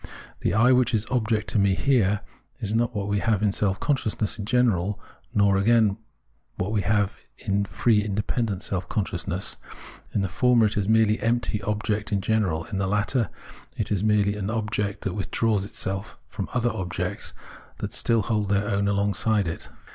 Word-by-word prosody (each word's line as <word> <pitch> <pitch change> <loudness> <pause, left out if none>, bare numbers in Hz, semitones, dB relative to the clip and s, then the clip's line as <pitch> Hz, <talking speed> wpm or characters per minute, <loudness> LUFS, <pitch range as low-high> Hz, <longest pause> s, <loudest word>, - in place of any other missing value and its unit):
The - - 0
I 120 +4 +5
which 125 -2 +3
is 105 0 0
object 110 -3 0
to 110 - +1
me 100 -1 +3
here 105 -6 +2 0.4
is 105 -3 -2
not 120 +1 +1
what 100 -1 -2
we 100 0 +1
have 110 -1 +1
in 105 - +3
self 95 -1 0
consciousness 110 -6 0
in 100 - -4
general, 105 -5 +1 0.3
nor 100 -1 +3
again 110 0 +4 0.6
what 95 +3 -2
we 105 -2 +1
have 105 -1 +1 0.2
in 100 0 -1
free 110 +1 +2
independent 105 0 -2
self 90 -2 -3
conscious 95 -4 -2
ness; 95 +1 -1 0.5
in 100 - 0
the 95 - 0
former 120 +5 +3
it 105 - 0
is 100 0 0
merely 110 0 +4
empty 115 -2 0
object 105 +1 -2
in 100 - +2
general, 95 -6 0
in 100 - -4
the 95 - 0
latter, 105 +2 0 0.5
it 110 - -2
is 100 -1 +1
merely 105 -1 +2
an 105 -1 -3
object 105 -2 -2
that 95 - -2
withdraws 105 0 0
itself 95 0 -4
from - - -5
other 120 -1 +1
objects 95 -5 -3 0.4
that - - -5
still 115 -3 +2
hold 105 -2 0
their 100 0 +1
own 100 -1 +1
alongside 100 0 +1
it. 80 - -6
105 Hz, 180 wpm, -25 LUFS, 100-110 Hz, 0.6 s, I